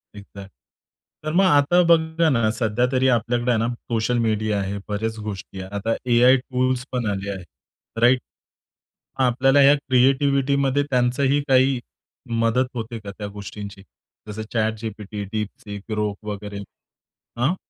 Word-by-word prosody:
Exact, 100 -1 -11 0.7
तर 155 - -2
मग 190 +3 +4
आता 165 +1 +4
बघा 160 0 +3
ना 115 -6 +2
सध्या 115 +1 0
तरी 130 0 +2
आपल्याकडे 120 +1 +1
आहे 115 - +2
ना 115 - 0
सोशल 120 0 -2
मीडिया 110 -2 0
आहे, 100 +1 -3
बऱ्याच 110 +2 -3
गोष्टी 100 -2 -7
आहे. 95 - -8
आता 110 +3 -1 0.2
एआई 125 +2 +6
टूल्स 130 0 -1
पण 125 -2 -2
आले 100 0 -4
आहेत. 95 -3 -7 0.6
राइट? 125 +2 +5 1.0
आपल्याला 130 +2 +3
ह्या 140 +1 +7
क्रिएटिव्हिटीमध्ये 140 +1 +2
त्यांचाही 130 +2 +2
काही 130 -1 +3 0.6
मदत 120 +3 +2
होते 115 0 -5
का 100 -2 -8
त्या 105 - -5
गोष्टींची? 100 -1 -9 0.4
जसं 105 +1 -6
ChatGPT, 110 -2 -3
DeepSeek, 105 -1 -5
Grok 105 -1 -1
वगैरे, 105 0 -6 0.8
अं? 135 +9 +1
120 Hz, 135 wpm, -22 LUFS, 105-130 Hz, 1.0 s, ह्या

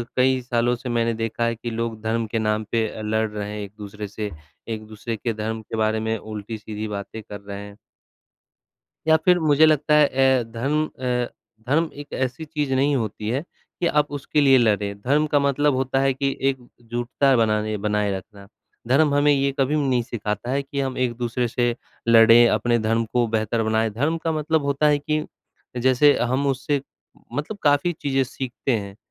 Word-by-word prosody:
कई 130 0 +3
सालों 120 0 +1
से 125 +1 -7
मैंने 115 -1 +1
देखा 115 +1 -2
है 115 0 0
कि 120 +1 -6
लोग 115 -1 -3
धर्म 110 +1 -1
के 115 +1 -2
नाम 110 0 0
पे 115 -1 +1
अ, 110 - -7
लड़ 110 +1 0
रहे 105 -1 -5
हैं 105 - -5
एक-दूसरे 105 +1 -8
से, 105 +1 -5 0.4
एक-दूसरे 110 0 -5
के 115 +2 -2
धर्म 110 +1 -4
के 110 - -7
बारे 110 0 +1
में 110 0 -1
उल्टी-सीधी 110 0 -6
बातें 105 +1 -6
कर 100 -1 -9
रहे 100 0 -7
हैं। 100 0 -13 1.3
या 160 0 +6
फिर 180 -1 +5
मुझे 155 -1 +5
लगता 150 0 +3
है 150 -1 +6
ए 130 -2 +3
धर्म 140 +7 0
अ, 125 -3 -2 0.4
धर्म 160 +4 +2
एक 145 - -11
ऐसी 130 +4 -2
चीज़ 145 -2 -3
नहीं 140 +2 +2
होती 110 -3 -3
है 130 +5 0 0.4
कि 175 - +1
आप 150 -2 +2
उसके 145 +1 0
लिए 135 -2 +6
लड़ें। 105 -3 +1
धर्म 145 +7 +2
का 145 - +5
मतलब 140 +1 +2
होता 130 +1 0
है 135 0 +3
कि 135 +1 -1
एकजुटता 120 +1 -1
बनाने 110 -1 +1
बनाए 105 0 0
रखना। 100 +1 -11 0.4
धर्म 140 +3 +4
हमें 145 +1 +4
ये 140 0 +2
कभी 140 +3 +2
नहीं 130 -5 +1
सिखाता 110 -1 -4
है 140 +2 0
कि 140 0 -4
हम 135 -1 -2
एक 125 -2 +1
दूसरे 120 0 -1
से 120 +1 0 0.3
लड़ें, 115 +1 +7
अपने 120 0 +2
धर्म 115 +1 +1
को 120 -1 +2
बेहतर 110 +1 0
बनाएँ। 110 0 +1
धर्म 145 +10 0
का 165 - +1
मतलब 155 0 0
होता 140 +1 +1
है 150 -1 +4
कि 150 +1 -1 0.5
जैसे 130 +4 +4
हम 130 +4 0
उससे 140 +1 0 0.5
मतलब 150 +9 -4
काफ़ी 145 +4 +3
चीज़ें 135 -1 +1
सीखते 130 0 -4
हैं। 100 -1 -8
120 Hz, 190 wpm, -23 LUFS, 110-140 Hz, 1.3 s, लड़ें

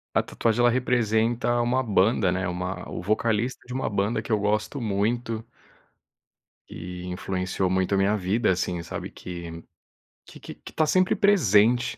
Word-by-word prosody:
A - - +3
tatuagem, 115 0 -1
ela 120 0 +5
representa 120 -1 +1
uma 125 +2 +1
banda, 100 -2 +2
né, 95 -1 -1
uma 90 +2 -4
o - - -5
vocalista 110 +4 0
de 125 - -7
uma 130 - -2
banda, 105 +2 -1
que - - -7
eu 105 - +3
gosto 105 +6 -1
muito 115 +2 -1 1.2
e 90 +1 -8
influenciou 95 +1 -2
muito 95 +1 +1
a - - +1
minha 100 +2 +2
vida, 100 +2 +1
assim, 90 -1 -1
sabe, - - -6
que 85 -2 -8 0.6
que - - -13
que - - -9
que - - -13
tá 155 - +2
sempre 185 +3 +2
presente 120 - +3
105 Hz, 160 wpm, -25 LUFS, 95-120 Hz, 1.2 s, ela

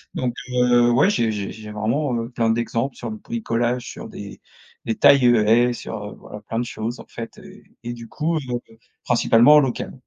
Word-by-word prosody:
Donc 125 -2 -1 0.2
heu, 125 -1 +3
ouais, 130 +10 +4
j'ai 115 - +1
j'ai 100 -2 -4
j'ai 110 -1 -10
vraiment, 120 +6 -1
heu, 115 0 -3
plein 115 -2 0
d'exemple 115 +3 -1
sur - - -6
le 220 - -6
bricolage, 125 - -2
sur - - -8
des - - -10 0.4
des 115 - -1
tailles 140 +3 +6
haies 120 +1 +4
et - - -2
sur, 105 -3 -7
voilà, 105 - -11
plein 115 +2 -5
de 120 - -1
choses, 115 +1 -5
en - - -10
fait 115 -1 -8
et - - -14 0.2
et 120 0 -4
du 115 -1 -10
coup, 160 +6 -1
heu, 125 -5 -3 0.5
principalement 120 +2 +5
en - - +8
local. 135 -4 -2
120 Hz, 205 wpm, -22 LUFS, 115-125 Hz, 0.5 s, en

